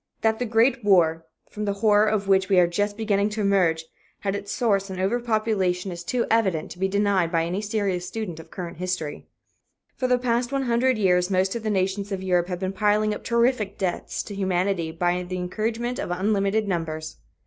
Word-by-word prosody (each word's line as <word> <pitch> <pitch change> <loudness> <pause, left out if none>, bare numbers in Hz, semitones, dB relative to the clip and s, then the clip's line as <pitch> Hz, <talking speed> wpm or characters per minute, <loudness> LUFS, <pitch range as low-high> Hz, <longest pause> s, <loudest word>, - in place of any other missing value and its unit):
That 220 0 +1
the 245 - 0
Great 235 +3 +2
War, 165 -5 +3 0.2
from 210 0 -4
the 200 - 0
horror 210 0 +5
of 210 -2 0
which 190 -1 +3
we 195 - +4
are 175 - +6
just 205 +4 -1
beginning 205 -2 +1
to 215 0 -3
emerge, 180 -5 +2 0.4
had 195 -1 -1
its 200 0 -5
source 200 -4 +1
in 185 -1 -5
overpopulation 210 -4 0
is 175 0 -7
too 240 +7 0
evident 190 -9 +1
to 180 - -10
be 190 - +2
denied 195 -3 +1
by 165 -2 +1
any 180 +4 -2
serious 200 -4 -1
student 205 -8 -5
of 160 - -12
current 175 -3 -7
history. 180 -4 -4 0.7
For 255 - -1
the 250 0 +3
past 245 0 0
one 275 -1 0
hundred 245 +1 +2
years 180 -3 +2
most 190 0 +1
of 235 - -3
the 220 - -2
nations 195 +1 -1
of 190 -1 -3
Europe 180 -2 +1
have 180 -1 -4
been 190 0 -2
piling 210 +2 +2
up - - -7
terrific 235 -3 +1
debts 185 -2 -2
to 205 - -8
humanity 185 -3 0
by 175 +2 0
the 180 +1 -5
encouragement 225 +7 -2
of - - -3
unlimited 200 +3 +1
numbers. 160 -3 -3
195 Hz, 205 wpm, -24 LUFS, 180-215 Hz, 0.7 s, are